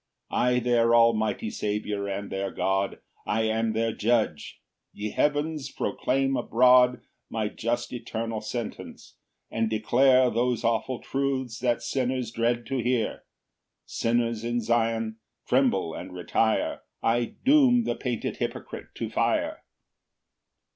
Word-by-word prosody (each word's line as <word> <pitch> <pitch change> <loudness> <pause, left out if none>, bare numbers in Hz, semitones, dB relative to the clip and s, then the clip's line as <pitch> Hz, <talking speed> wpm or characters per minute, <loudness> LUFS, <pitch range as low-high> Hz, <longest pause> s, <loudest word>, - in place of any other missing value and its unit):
4 - - 0
I 125 0 +3
their 120 -1 +3
almighty 110 -2 +2
Saviour 105 -1 -2
and 100 +1 -4
their 95 0 -2
God, 95 +1 -1 0.3
I 110 +2 +1
am 110 0 0
their 115 0 0
Judge: 110 -9 0 0.3
ye 105 0 -5
heavens, 150 0 0
proclaim 135 +1 0
abroad 125 +1 +4 0.3
My 110 -2 -2
just 120 +2 -3
eternal 115 -2 -4
sentence, 110 +1 -7 0.3
and 115 -1 0
declare 125 +4 +4
Those 120 0 0
awful 115 +2 0
truths 135 -3 -2
that 120 -2 0
sinners 130 -2 -1
dread 120 +1 0
to 135 +3 -2
hear: 120 -2 -1 0.6
Sinners 115 -1 0
in 120 +1 0
Zion, 115 -1 0 0.3
tremble 120 -11 +2
and 90 +3 -7
retire; 110 +5 0 0.2
I 120 +1 +1
doom 260 -4 +5
the - - -1
painted 120 -4 -3
hypocrite - - -6
to - - -3
fire. - - 0
115 Hz, 125 wpm, -26 LUFS, 110-125 Hz, 0.6 s, doom